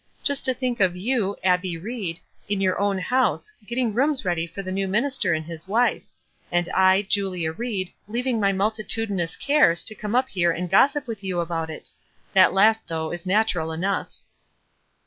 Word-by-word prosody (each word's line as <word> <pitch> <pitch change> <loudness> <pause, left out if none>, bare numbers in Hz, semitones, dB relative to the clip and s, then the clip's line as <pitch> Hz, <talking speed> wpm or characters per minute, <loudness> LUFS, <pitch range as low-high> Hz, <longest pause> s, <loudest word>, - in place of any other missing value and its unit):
"Just 285 -1 +1
to 260 - +4
think 250 -1 -2
of 185 -3 +3
you, 205 0 -1
Abbie 180 -2 +1
Ried, 190 -3 -5 0.3
in 205 -1 0
your 185 -1 +1
own 200 -1 +1
house, 260 - 0 0.2
getting 235 -2 -1
rooms 270 +1 +1
ready 170 -2 0
for 195 +4 -7
the 185 - -5
new 195 +1 -1
minister 225 -1 +1
and 155 0 -4
his 165 +1 -6
wife; 230 +5 +1 0.5
and 175 0 +2
I, 190 +1 +4
Julia 190 -5 -1
Ried, 195 -1 -3 0.2
leav 240 +3 -2
ing 245 -4 0
my 200 -1 +3
multitudinous 205 -3 -1
cares 280 - +3
to 215 - +2
come 210 +1 -4
up 260 +1 +2
here 175 -3 +1
and 175 +1 -4
gossip 275 +8 +4
with 225 -5 -7
you 185 -2 -2
about 165 -1 -2
it 155 - -4
I - - -38
That 190 -1 +6
last, 220 +3 +4
though, 160 -1 -3
is 175 +1 -6
natural 185 -5 +1
enough." 185 +5 -2
195 Hz, 185 wpm, -24 LUFS, 175-230 Hz, 0.5 s, That